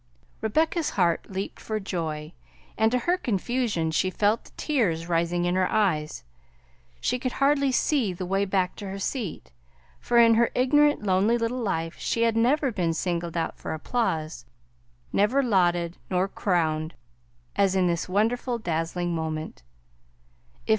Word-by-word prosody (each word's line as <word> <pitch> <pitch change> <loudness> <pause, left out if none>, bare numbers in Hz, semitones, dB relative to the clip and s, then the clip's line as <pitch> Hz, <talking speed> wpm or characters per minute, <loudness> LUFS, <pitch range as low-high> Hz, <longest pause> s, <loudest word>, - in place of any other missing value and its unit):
Rebecca's 315 +8 +1
heart 175 -4 +1
leaped 195 0 -5
for 215 -1 -3
joy, 160 -5 -4 0.4
and 220 +1 +2
to 250 - +2
her 345 +9 +1
confusion 220 - -1
she 185 +3 +1
felt 210 +4 +1
the - - -16
tears 185 - 0
rising 175 +1 0
in 175 - +1
her 185 0 +1
eyes. 160 - 0 0.8
She 250 - -1
could 255 0 -2
hardly 275 -1 +2
see 255 -4 +1
the 180 +1 -5
way 195 +2 +1
back 190 -2 0
to 205 - -6
her 195 - -5
seat, 200 - -4 0.5
for 240 - 0
in 230 -1 +7
her 230 +1 +3
ignorant 295 +1 +3
lonely 200 +4 +3
little 235 +2 -2
life 165 -6 -2
she 230 - 0
had 230 -1 +2
never 260 +4 +2
been 170 -6 -1
singled 170 0 -2
out 165 - -2
for - - -4
applause, 160 -4 -2 0.7
never 245 +8 +3
lauded, 175 -6 +1
nor 185 +1 +1
crowned, 160 -5 -1 0.6
as 195 -1 +2
in 185 -1 +3
this 170 0 -1
wonderful, 235 +5 0
dazzling 170 -2 -2
moment. 160 -1 -4
195 Hz, 150 wpm, -26 LUFS, 170-235 Hz, 0.8 s, in